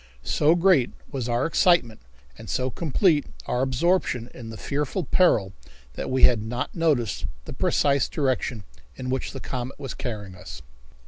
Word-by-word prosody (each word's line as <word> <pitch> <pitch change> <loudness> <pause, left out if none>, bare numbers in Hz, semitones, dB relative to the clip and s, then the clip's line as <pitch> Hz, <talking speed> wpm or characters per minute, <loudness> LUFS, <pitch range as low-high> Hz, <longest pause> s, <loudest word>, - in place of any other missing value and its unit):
So 155 +3 +3
great 175 -7 +4 0.2
was 130 -4 -3
our 120 +2 +1
excitement 165 -8 +3 0.3
and 110 - -11
so 130 +5 -1
complete 160 - +2 0.2
our 125 - -1
absorption 130 -2 +1
in 115 -3 -9
the 110 - -8
fearful 145 - -2
peril 110 - +3 0.4
that - - -5
we 130 0 0
had 120 -4 +6
not 120 +5 -4
noticed 150 - 0 0.2
the - - -7
precise 140 -2 +2
direction 130 -6 -1 0.3
in 130 -1 -4
which 130 - -2
the 135 - -7
comet 125 0 -5
was 135 - -5
carrying 105 -6 -5
us. 80 -9 -10
130 Hz, 155 wpm, -25 LUFS, 120-150 Hz, 0.4 s, had